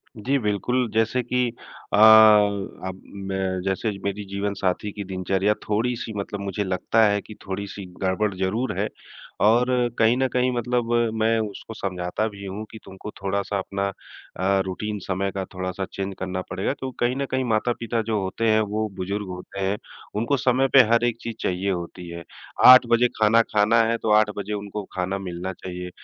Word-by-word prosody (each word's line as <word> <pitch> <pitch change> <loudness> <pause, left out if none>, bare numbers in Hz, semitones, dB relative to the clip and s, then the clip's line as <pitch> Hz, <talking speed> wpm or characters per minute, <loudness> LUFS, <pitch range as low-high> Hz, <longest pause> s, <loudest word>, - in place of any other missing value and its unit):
जी, 130 +6 0
बिल्कुल 115 +3 0
जैसे 115 +3 +2
कि 125 +1 0 0.5
अ, - - +4
अब 105 -3 +5 0.3
मैं 95 -1 -1
जैसे 95 +3 -1
मेरी 100 +1 -3
जीवनसाथी 100 0 -2
की 105 0 -6
दिनचर्या 95 +2 0
थोड़ी-सी 115 +1 -1
मतलब 100 0 -4
मुझे 100 +1 -2
लगता 95 +4 +1
है 100 0 +1
कि 110 - -12
थोड़ी-सी 100 0 -5 0.2
गड़बड़ 95 +2 0
ज़रूर 100 +7 -1
है। - - +1 0.6
और 120 +3 +5 0.3
कहीं 115 +2 +5
न 130 0 +2
कहीं 125 0 +2
मतलब 120 0 -1 0.2
मैं 110 +1 +2
उसको 110 +1 -5
समझाता 95 +1 -2
भी 100 -2 -9
हूँ 100 +3 -5
कि 110 - -9
तुमको 95 +2 -9
थोड़ा-सा 100 +1 -1
अपना 100 +1 -2 0.5
अ, 95 +1 +2
रूटीन 105 +2 -4
समय 95 +1 -2
का 95 -1 -3
थोड़ा-सा 95 +1 -3
चेंज 95 0 -3
करना 95 0 -3
पड़ेगा। - - -1
तो 130 0 -4
कहीं 120 +1 +1
न 140 - -1
कहीं 130 0 +1
माता-पिता 115 0 0
जो 110 -1 -1
होते 95 +4 -2
हैं, 110 0 +4
वो 110 +1 -1
बुजुर्ग 100 +2 -3
होते 90 +2 -8
हैं 100 +2 0 0.4
उनको 120 +6 +1
समय 130 +2 +2
पे 135 - +10
हर 115 - +3
एक 120 -1 0
चीज़ 115 -2 -5
चाहिए 95 +2 -1
होती 90 0 -5
है। 85 0 -7 0.4
8 130 -1 +10
बजे 120 +1 +5
खाना 110 +2 +6
खाना 110 +1 +3
है, 115 +1 +1
तो 110 - -1
8 105 0 +5
बजे 100 +1 -3
उनको 105 0 -5
खाना 95 +1 -2
मिलना 90 0 -5
चाहिए। 90 0 -7
105 Hz, 175 wpm, -24 LUFS, 95-115 Hz, 0.6 s, पे